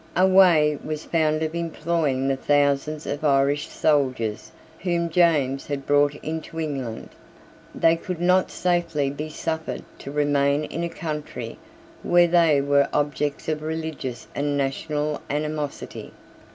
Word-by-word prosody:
A 185 - +5
way 175 -6 +5
was 155 0 -4
found 155 -1 +1
of 160 0 -2
employing 165 -5 -1
the 135 - +2
thousands 145 +2 +1
of 145 +1 -4
Irish 140 0 +2
soldiers 130 -5 0 0.3
whom 170 -2 -1
James 150 -6 +2
had 140 -2 -4
brought 145 0 +3
into 160 +1 -5
England. 135 -8 -4 0.7
They 165 0 +4
could 180 0 -5
not 180 +1 +3
safely 170 -6 0
be 150 +2 -5
suffered 160 +1 -4 0.2
to - - -8
remain 145 0 +2
in 165 +2 -4
a 170 - -1
country 150 -8 -6 0.4
where 175 0 +4
they 165 -4 +4
were 140 0 +3
objects 145 0 -1
of 155 -1 -1
religious 155 -6 -4
and 145 0 -1
national 150 +2 -2
animosity. 150 0 -4
150 Hz, 135 wpm, -24 LUFS, 140-165 Hz, 0.7 s, A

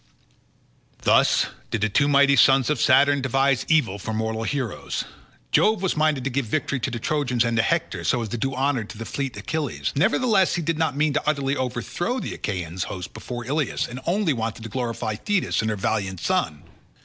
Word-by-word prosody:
Thus - - +4 0.2
did 115 - -2
the 110 - +3
two 140 +8 +2
mighty 140 0 +5
sons 135 +2 +5
of 145 - 0
Saturn 140 +1 +4
devise 135 0 +1
evil 125 -11 +2
for 110 +3 -4
mortal 110 0 -2
heroes. 130 -4 -3 0.5
Jove 215 -2 +3
was 190 - +1
minded 155 -4 +1
to 135 - -2
give 130 -1 -1
victory 140 +2 -1
to 130 - -2
the 120 - -4
Trojans 125 -2 0
and 115 0 0
to - - +5
Hector, 115 - -1
so 120 - +1
as 110 - -5
to 120 - -3
do 135 +3 -1
honour 135 -2 0
to 110 +2 -8
fleet 135 -1 -4
Achilles, 140 - -3
nevertheless 195 - +3
he 175 - -2
did 165 0 -1
not 155 -4 0
mean 150 0 +2
to 150 - 0
utterly 140 -2 0
overthrow 130 - -2
the - - -5
Achaean 90 -3 -4
host 90 0 -5
before 120 -1 -6
Ilius, 145 +3 -1
and 125 +1 -7
only 180 -2 +2
wanted 115 -1 -4
to 115 - -6
glorify 115 -2 -3
Thetis 205 - 0
and 110 - -1
her 105 - -1
valiant 95 -2 -2
son. 75 -2 -1
130 Hz, 195 wpm, -24 LUFS, 115-150 Hz, 0.5 s, mighty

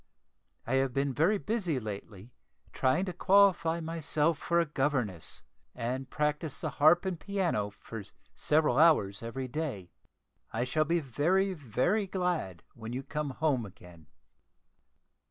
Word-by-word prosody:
I 130 +3 +1
have 135 -1 +1
been 135 0 0
very 170 +10 +3
busy 195 - -1
lately, 105 0 -8 0.4
trying 130 +8 +2
to 185 - -4
qualify 185 -3 +4
myself 160 -1 0
for 170 +1 +1
a 170 - +3
governess, 135 - -2 0.3
and 130 +3 -3
practise 150 +1 -2
the - - -3
harp 160 +5 +5
and 185 -3 -2
piano 175 - -1
for 105 +1 -9 0.3
several 150 -4 +2
hours 125 -12 +4
every 130 +3 -4
day. 125 - -4 0.6
I 115 - -1
shall 155 +5 +1
be 170 +2 +1
very 175 +9 +1
very 165 - 0
glad 180 - -2
when 115 0 -7
you 130 +2 -3
come 150 +1 -3
home 135 -2 0
again." 90 -5 -13
150 Hz, 135 wpm, -30 LUFS, 120-170 Hz, 0.6 s, harp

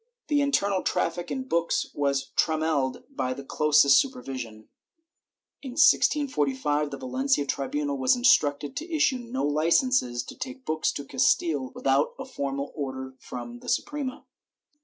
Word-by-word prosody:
^ - - -44 0.3
The 295 -1 +3
internal 200 -9 +1
traffic 175 +1 -1
in 260 -1 -4
books 170 -6 +1
was 140 -1 -1
trammelled 155 -4 0
by 130 - -1
the 140 - -8
closest 145 -1 +5
super 255 -2 -6
vision. 115 -5 -7 0.9
In 265 -3 -7
1645 150 - +2
the 140 - -6
Valencia 145 - 0
tribunal 140 0 -2
was 130 - +4
instructed 145 - +3
to 330 +3 -5
issue 295 -5 +2
no 245 +2 -4
licences 155 - +2
to - - -10
take 260 0 -7
books 155 0 0
to 140 - -6
Castile 135 +1 +1
without 135 +2 +1
a 270 - -6
formal 140 - -4
order 130 -2 -5
from 120 -1 -8
the - - -8
Suprema. 285 -3 -2
150 Hz, 145 wpm, -26 LUFS, -, 0.9 s, closest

